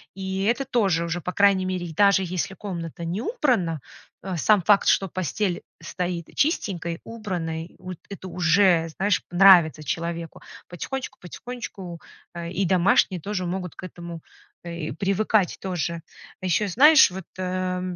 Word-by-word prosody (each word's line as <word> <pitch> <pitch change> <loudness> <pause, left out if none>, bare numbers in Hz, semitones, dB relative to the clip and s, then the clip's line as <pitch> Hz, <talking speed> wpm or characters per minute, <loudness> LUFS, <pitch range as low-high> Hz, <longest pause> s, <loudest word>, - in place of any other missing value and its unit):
И 190 0 -3
это 240 +6 +1
тоже 195 -10 +1
уже, 170 +1 -3
по 180 - -4
крайней 200 -2 +4
мере, 180 -2 -3
даже 200 +1 +5
если 185 +1 -3
комната 170 -5 -6
не 175 +5 -3
убрана, 230 - 0 0.4
э, 185 -3 -4
сам 205 +5 +4
факт, 200 +3 +4
что 195 - +3
постель 185 +2 -2 0.2
стоит 175 -2 -4
чистенькой, 180 - -1
убранной, 175 -7 -5
вот 185 -1 -7
это 195 -2 -8
уже, 175 -1 +3
знаешь, 195 0 +1
нравится 175 -4 +6
человеку. 170 +2 -4 0.3
Потихонечку 260 +9 -5
потихонечку, 190 -3 -8 0.4
э, 170 0 -5
и 190 +2 -1
домашние 185 +1 +3
тоже 185 +1 -3
могут 180 -2 -4
к - - -10
этому, 170 -2 -8 0.4
э, 170 - -7 0.2
и - - -5
привыкать 195 0 +1
тоже. 170 -3 -3 0.4
Ещё, 185 +3 +1
знаешь, 300 - +7
вот, 190 +1 -7
э, 185 0 -2
185 Hz, 145 wpm, -24 LUFS, 170-200 Hz, 0.4 s, знаешь